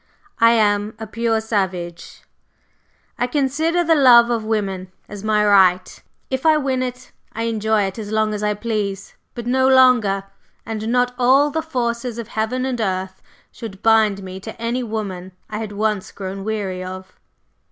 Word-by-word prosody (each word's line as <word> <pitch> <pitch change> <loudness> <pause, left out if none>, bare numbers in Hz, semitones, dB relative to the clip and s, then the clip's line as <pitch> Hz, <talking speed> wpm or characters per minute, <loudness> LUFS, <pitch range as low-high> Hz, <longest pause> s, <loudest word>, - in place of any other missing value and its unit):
I 230 0 +6
am 210 -1 +1
a 220 - -6
pure 225 +1 0
savage; 190 -6 -3 1.0
I 245 - +1
consider 305 +6 0
the 330 -1 +3
love 240 -5 +6
of 230 -2 -1
woman 195 -4 -2 0.2
as 205 -1 -9
my 215 -1 +2
right; 185 -3 +3 0.3
if 260 0 -2
I 315 -1 +5
win 265 -3 -1
it, 250 0 -5 0.2
I 225 - -3
enjoy 220 -2 +1
it 195 +3 -4
as 210 -1 -6
long 215 0 +1
as 210 - -4
I 210 0 0
please, 205 -3 -3 0.2
but 240 -1 -6
no 260 +2 +2
longer, 250 -7 +4 0.4
and 220 0 -4
not 245 +1 +1
all 270 +4 +4
the 320 +2 -1
forces 240 -5 -3
of 230 -1 -6
heaven 230 +4 -2
and 250 -3 -2
earth 190 -2 -3 0.3
should 215 -3 -9
bind 220 -3 +3
me 185 0 -7
to 220 +4 -9
any 235 +2 -1
woman 200 -5 -5 0.2
I 210 - -3
had 220 -2 -5
once 210 -1 -2
grown 195 0 -6
weary 200 -4 -3
of." 185 0 -8
220 Hz, 170 wpm, -20 LUFS, 200-245 Hz, 1.0 s, I